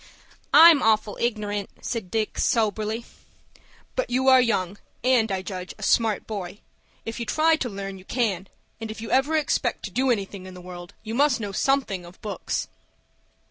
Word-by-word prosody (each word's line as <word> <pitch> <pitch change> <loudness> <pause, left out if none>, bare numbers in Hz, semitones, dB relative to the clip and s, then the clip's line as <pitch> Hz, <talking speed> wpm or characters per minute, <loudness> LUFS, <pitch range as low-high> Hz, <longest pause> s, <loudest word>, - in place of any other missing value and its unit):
"I'm 320 -1 +9
awful 215 -1 +2
ignorant," 210 -4 -1
said 225 -6 -4
Dick, 220 +2 -2
soberly. 220 0 0 0.9
"But - - -1
you 260 +2 +3
are 260 -1 +7
young, 200 -5 0 0.2
and, 245 -4 +3
I 190 -1 -2
judge, 185 -2 -6
a - - -9
smart 225 -3 +2
boy. 200 -2 -6 0.4
If 225 +1 -5
you 235 - -3
try 320 +1 +3
to 250 - -3
learn, 195 -1 -6
you 185 - -16
can, 200 -7 -1 0.3
and 225 -1 -6
if 215 - -7
you 225 - -6
ever 270 +5 +3
expect 305 - 0
to - - -6
do 265 +1 +1
anything 200 -4 -2
in 185 - -10
the - - -10
world, 175 -1 -10
you 220 0 -5
must 270 0 +3
know 205 -3 -4
something 235 -5 0
of 175 +1 -14
books." 210 -2 -3
220 Hz, 180 wpm, -25 LUFS, 195-250 Hz, 0.9 s, I'm